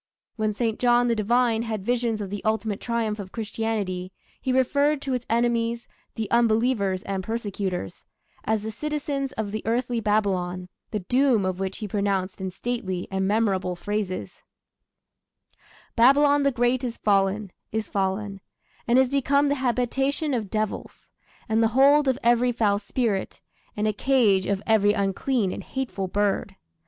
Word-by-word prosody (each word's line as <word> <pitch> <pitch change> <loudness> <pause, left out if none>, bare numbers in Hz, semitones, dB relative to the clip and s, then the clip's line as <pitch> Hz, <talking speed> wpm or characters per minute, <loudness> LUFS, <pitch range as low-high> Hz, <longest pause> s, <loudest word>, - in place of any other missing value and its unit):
When 215 -2 -1
St. 225 -1 -1
John 245 0 +3
the 230 - +2
Divine 230 +1 +2
had 220 -4 -4
visions 235 -2 0
of 195 -2 -5
the 205 - -5
ultimate 220 -2 -1
triumph 225 -3 -1
of 190 -2 -7
Christianity, 210 -5 -3 0.3
he 260 - -1
referred 280 +3 +2
to 270 - -2
its 250 -1 -3
enemies 235 0 0 0.3
the 220 -2 -2
unbelievers 225 -4 +2
and 195 -1 -3
persecutors 200 - -4 0.4
as 220 -1 0
the 220 - -4
citizens 285 0 -3
of 220 -4 -3
the 215 0 -3
earthly 240 +1 0
Babylon, 185 -4 0 0.2
the 210 -3 -3
doom 245 +1 +2
of 185 0 -2
which 195 0 -3
he 215 - -5
pronounced 195 -2 -1
in 190 - -2
stately 190 -3 -3
and 190 0 0
memorable 195 -4 +1
phrases: 205 0 -4 1.5
Babylon 285 +4 +5
the 280 0 +3
great 245 +1 +1
is 240 -2 -3
fallen, 200 0 +1 0.2
is 220 0 -2
fallen, 195 0 -2 0.5
And 240 +1 +4
is 260 0 +5
become 280 +2 +2
the - - +3
habitation 270 +4 0
of 220 -5 -2
devils, 215 0 -4 0.4
And 220 +1 +2
the 225 - +5
hold 285 +2 +6
of 260 -1 +2
every 240 +1 +4
foul 210 -4 +1
spirit, 210 -2 -2 0.4
And 210 +1 +1
a 215 - +1
cage 210 -5 +3
of 200 0 -1
every 210 -2 +4
unclean 200 +2 0
and - - -6
hateful 245 -8 -4
bird.... 200 0 -1
220 Hz, 155 wpm, -25 LUFS, 200-245 Hz, 1.5 s, hold